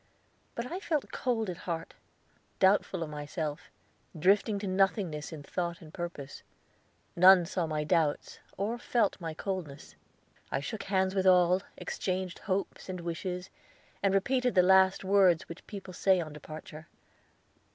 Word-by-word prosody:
But 235 - -3
I 360 - -3
felt 315 -7 -2
cold 230 -4 -1
at 180 -2 -4
heart, 165 -1 -3 0.6
doubtful 190 -2 +3
of 155 - -7
myself, 150 0 -5 0.5
drifting 200 +5 +3
to 200 - -5
nothingness 185 -5 0
in 155 -3 -8
thought 170 +2 -3
and 155 -1 -14
purpose. 170 -6 -6 0.7
None 185 0 +8
saw 170 0 -2
my 155 -1 -1
doubts 155 -2 0 0.2
or 220 +5 -2
felt 230 -5 0
my 165 -2 -4
coldness. 160 - -5 0.6
I - - 0
shook 200 +10 -5
hands 190 -1 +1
with 190 -1 +1
all, 180 0 +5 0.2
exchanged 185 -1 -3
hopes 195 -1 -3
and 185 -1 -4
wishes, 180 +2 -4 0.5
and 195 - +3
repeated 250 +4 +1
the 180 - +6
last 190 +1 +5
words 190 -3 +4
which 170 - -10
people 195 -3 -8
say 190 +1 +3
on 155 -3 -5
departure. 155 +1 -10
185 Hz, 145 wpm, -30 LUFS, 165-195 Hz, 0.7 s, None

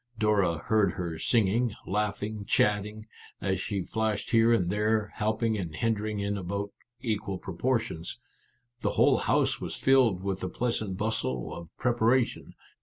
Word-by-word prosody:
Dora 105 -6 +2
heard 110 -2 +3
her 85 -3 -4
singing, 115 +2 +2
laughing, 105 +1 -2
chatting, 105 +1 +1 0.3
as 95 -2 -1
she 100 -1 -2
flashed 110 +1 -2
here 115 0 +5
and 90 -7 +2
there, 105 0 +1
helping 110 +1 0
and 85 -4 -5
hindering 110 +2 -1
in 100 0 -1
about 100 +2 -3 0.3
equal 105 -4 -2
proportions. 105 -2 -2 0.6
The - - 0
whole - - +5
house - - +1
was - - -4
filled 125 -9 +3
with 95 -1 -2
the 95 - -3
pleasant 110 -5 -2
bustle 95 - -2
of 85 -2 -8
preparation. 120 0 +1
105 Hz, 140 wpm, -28 LUFS, 95-110 Hz, 0.6 s, here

